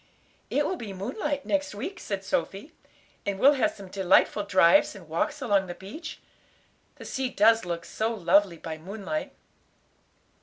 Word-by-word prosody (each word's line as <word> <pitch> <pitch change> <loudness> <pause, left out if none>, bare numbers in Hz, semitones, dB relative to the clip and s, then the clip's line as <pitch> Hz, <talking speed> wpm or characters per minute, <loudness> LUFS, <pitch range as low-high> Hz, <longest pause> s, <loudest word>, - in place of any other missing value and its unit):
"It 290 - +1
will 375 - -2
be 210 -8 -7
moonlight 270 +9 -3
next 290 -6 -1
week," 350 - -5
said 200 -1 -4
Sophy; 200 - -3 0.5
"and 200 -1 -2
we'll 275 +8 +6
have 260 -5 +2
some 200 -2 -10
delightful 190 +2 +3
drives 185 -1 +4
and 185 -5 -12
walks 275 - -2
along 200 -5 +2
the 175 - -6
beach. 310 - -9 0.8
The - - -11
sea 265 -1 -2
does 225 -2 +4
look 170 -1 -4
so 220 +1 -2
lovely 195 -3 +3
by 160 -1 -7
moonlight." 205 - -5
205 Hz, 155 wpm, -27 LUFS, 190-270 Hz, 0.8 s, we'll